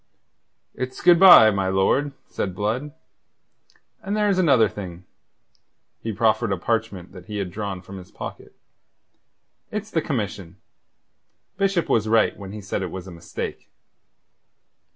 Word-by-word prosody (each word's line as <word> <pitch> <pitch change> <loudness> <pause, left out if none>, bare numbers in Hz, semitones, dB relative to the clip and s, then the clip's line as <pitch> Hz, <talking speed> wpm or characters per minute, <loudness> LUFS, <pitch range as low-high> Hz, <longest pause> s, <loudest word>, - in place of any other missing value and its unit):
"It's 130 0 -5
good 175 -1 +5
bye, 175 - +9
my 100 -2 -1
lord," 95 +10 +1
said 95 -3 -4
Blood. 115 +9 -2 1.1
"And 200 +2 -3
there's 205 -3 +2
another 135 -11 +4
thing." 90 -3 -9 1.0
He 115 - -3
proffered 110 +1 +1
a 95 - 0
parchment 105 -2 -3
that 90 -1 -13
he 105 - -5
had 95 -3 -3
drawn 100 -2 -5
from 95 0 -9
his 90 - -13
pocket. - - -9 1.1
"It's 215 +1 -5
the 165 - +1
commission. 100 - -4 1.0
Bishop 195 -3 +1
was 110 -1 +1
right 115 0 +3
when 95 -2 -9
he 105 0 -7
said 95 0 -3
it 95 - -3
was 95 +1 -7
a 95 - -10
mistake." 85 0 -7
105 Hz, 140 wpm, -23 LUFS, 95-140 Hz, 1.1 s, bye